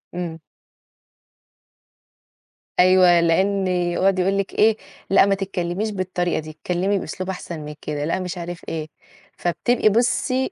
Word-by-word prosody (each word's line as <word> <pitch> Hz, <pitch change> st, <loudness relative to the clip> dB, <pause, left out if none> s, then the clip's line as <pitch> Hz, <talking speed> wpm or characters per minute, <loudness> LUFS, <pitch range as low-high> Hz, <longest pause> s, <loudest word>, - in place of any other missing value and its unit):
إمم. 170 Hz, -2 st, -4 dB, 2.4 s
أيوه 180 Hz, -1 st, +6 dB
لأن 190 Hz, +3 st, +2 dB
يقعد 180 Hz, +1 st, +1 dB
يقول 195 Hz, +2 st, +1 dB
لِك 200 Hz, -1 st, -2 dB
إيه؟ 220 Hz, 0 st, +4 dB, 0.3 s
لأ، 195 Hz, 0 st, +6 dB
ما 200 Hz, 0 st, +2 dB
تتكلميش 195 Hz, +1 st, -3 dB
بالطريقة 185 Hz, -3 st, -1 dB
دي، 155 Hz, 0 st, -8 dB
اتكلمي 180 Hz, +5 st, -1 dB
بأسلوب 185 Hz, +3 st, -5 dB
أحسن 180 Hz, -3 st, -5 dB
من 150 Hz, 0 st, -8 dB
كده، 145 Hz, -1 st, -3 dB
لأ 165 Hz, +4 st, -1 dB
مش 180 Hz, 0 st, -5 dB
عارف 175 Hz, 0 st, -6 dB
إيه، 155 Hz, -1 st, -4 dB, 0.5 s
فبتبقى 215 Hz, +6 st, +1 dB
بُصي 245 Hz, +3 st, +1 dB
185 Hz, 130 wpm, -22 LUFS, 175-195 Hz, 2.4 s, أيوه